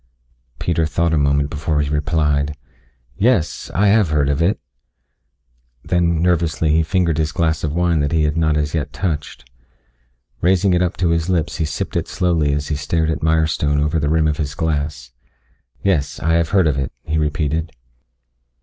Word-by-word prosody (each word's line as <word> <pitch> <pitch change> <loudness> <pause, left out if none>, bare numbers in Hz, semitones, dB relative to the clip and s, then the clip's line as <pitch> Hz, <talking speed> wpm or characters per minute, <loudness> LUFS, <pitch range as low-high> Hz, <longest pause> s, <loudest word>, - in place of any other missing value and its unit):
Peter 85 -2 0
thought 85 +1 0
a - - +3
moment 70 0 +1
before 75 0 -1
he 75 - 0
replied. 75 -1 0 0.6
"Yes. 100 -5 +1
I 100 +2 +4
have 105 -4 +3
heard 75 -2 +1
of 70 +2 0
it." 95 +6 +1 1.3
Then 85 -2 +1
nervously 85 -3 +1
he 80 +1 +3
fingered 85 -1 0
his 75 -1 0
glass 80 -2 0
of 75 - -1
wine 85 0 +1
that 70 0 0
he 80 -1 +2
had 75 0 0
not 80 -2 +1
as 75 0 -1
yet 75 -4 -2
touched. 75 -6 -4 0.9
Raising 95 +2 +3
it 90 - +2
up 90 -1 -1
to 90 -1 +1
his 85 +1 0
lips 85 -4 0
he 80 - 0
sipped 75 - -4
it - - -1
slowly 85 -5 +1
as 75 +1 -2
he 75 - 0
stared 80 +2 0
at - - -4
Mirestone 80 -2 +1
over 75 +2 0
the 75 0 0
rim 80 0 +2
of 75 -1 -1
the 70 -2 -3
glass. 75 -5 -2 0.7
"Yes. 75 -8 0
I 80 +1 0
have 85 -1 +2
heard 95 -4 +3
of 75 -3 +1
it," 65 - -3
he 80 0 -1
repeated. 75 +1 -1
80 Hz, 185 wpm, -19 LUFS, 75-85 Hz, 1.3 s, I